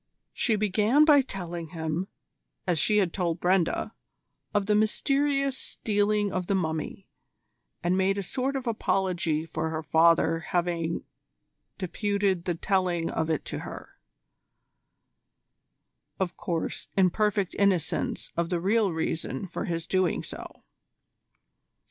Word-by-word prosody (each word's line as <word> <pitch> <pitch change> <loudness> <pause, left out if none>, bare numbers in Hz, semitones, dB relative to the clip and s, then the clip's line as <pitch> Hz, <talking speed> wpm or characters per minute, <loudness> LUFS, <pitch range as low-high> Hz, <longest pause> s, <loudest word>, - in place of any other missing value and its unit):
She 225 - +1
began 215 +8 +3
by 295 -3 +7
telling 175 -8 -5
him, 160 +2 -3 0.6
as 175 -4 +1
she 210 +7 +4
had 190 -5 +2
told 175 -3 -1
Brenda, 180 -1 +1 0.6
of 205 -1 +1
the 210 - +2
mysterious 275 +6 +2
stealing 205 -4 0
of 185 -2 -2
the 200 - +2
Mummy, 160 -4 -3 0.8
and 175 +1 +2
made 190 +1 +2
a 200 - -1
sort 265 +8 -2
of 265 -2 -3
apology 185 -8 0
for 160 -1 -3
her 160 0 -3
father 165 +1 +4
having 170 -1 -1 0.7
deputed 200 -1 0
the 175 - 0
telling 175 -2 0
of 160 - -1
it 155 -3 -1
to - - -4
her - - -9 2.2
of 180 -2 -1
course, 170 -3 -3
in 185 -2 +5
perfect 210 -2 +1
innocence 190 -6 +1
of 170 0 0
the 175 -1 0
real 200 +2 +2
reason 160 -2 -2
for 180 - -4
his 165 -1 -2
doing 185 -1 +1
so. - - -9
185 Hz, 130 wpm, -27 LUFS, 165-205 Hz, 2.2 s, by